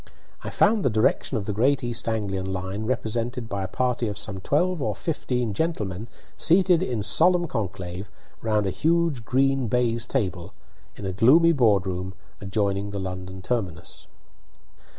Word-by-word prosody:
I - - -4
found 205 0 +3
the - - +3
direction 110 +3 +1
of 100 - -3
the 105 - -2
Great 130 +6 +2
East 120 -1 -1
Anglian 95 -4 -2
line 95 +3 -4
represented 120 0 -2
by 100 -2 -3
a 95 - -2
party 125 +3 -1
of 105 -2 -4
some 100 -2 -3
twelve 170 - 0
or 105 -5 -1
fourteen 125 -6 -2
gentlemen 105 - -2 0.3
seated 180 0 +4
in 120 - -2
solemn 175 - +4
conclave 95 - -5 0.3
round 110 -2 +1
a 95 - 0
huge 165 - +1
green 135 +2 +1
baize 115 -1 +1
table, 95 -10 -2 0.4
in 100 - -8
a 95 - -1
gloomy 145 - +6
board 110 - +3
room 95 0 -4 0.3
adjoining 100 0 -1
the 100 - -5
London 95 0 -6
terminus. 95 -8 -4
110 Hz, 155 wpm, -25 LUFS, 95-130 Hz, 0.4 s, gloomy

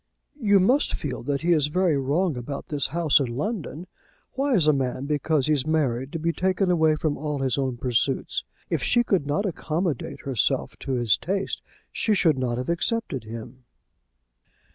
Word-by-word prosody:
"You 205 -3 +5
must 250 +10 +3
feel 145 -4 -4
that 140 +1 -1
he 175 +1 +4
is 150 -3 +2
very 175 +1 +2
wrong 145 +5 +1
about 125 +3 -6
this 145 -3 +2
house 165 0 +3
in 135 - 0
London. 180 - -3 0.5
Why 270 0 +1
is 175 -7 +3
a 155 - +5
man, 130 -1 -2
because 150 -1 +1
he's 150 -2 +1
married, 135 -4 0
to - - -1
be 165 +1 -1
taken 185 +1 +1
away 160 -3 +3
from 155 -1 -2
all 150 0 -2
his 135 -3 0
own 130 -3 -1
pursuits? 120 - 0 0.3
If - - 0
she 240 -1 +3
could 185 -10 0
not 175 +9 0
accommodate 165 -2 -2
herself 130 -6 0
to 135 - -3
his 120 -5 +2
tastes, 195 +2 -2 0.3
she 215 - +1
should 160 -8 +3
not 120 -2 -1
have 125 - -3
accepted 170 - -1
him." 115 +3 -9
150 Hz, 180 wpm, -25 LUFS, 135-180 Hz, 0.5 s, You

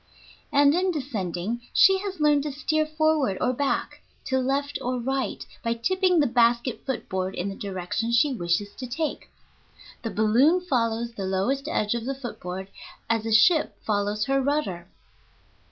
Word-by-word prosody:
And 285 0 +5
in 370 +3 +1
descending 225 - -3
she 385 0 +6
has 390 -2 -5
learned 295 -1 +4
to 295 +1 -3
steer 310 +2 0
forward 310 -9 +1
or 250 - +1
back, 280 +2 -2 0.2
to 260 0 +1
left 275 +2 -1
or 250 +1 -1
right, 265 +2 -2 0.2
by 230 -1 0
tipping 365 +8 +2
the 295 - +4
basket 240 0 +2
foot 265 -3 -3
board 190 0 -2
in 185 +3 -2
the 195 - -6
direction 195 +4 -3
she 265 +4 +3
wishes 190 0 -1
to 255 - -6
take. 300 +5 -3 0.7
The 225 - -3
balloon 235 - +3
follows 235 -8 -1
the 200 -4 -5
lowest 245 +10 -1
edge 210 -8 0
of 235 -1 -3
the 270 +1 -2
foot 260 -3 -7
board 185 +2 -6 0.4
as 225 -1 0
a - - -2
ship 300 +9 +4
follows 210 0 0
her 275 0 +1
rudder. 255 -12 -1
245 Hz, 170 wpm, -25 LUFS, 210-290 Hz, 0.7 s, she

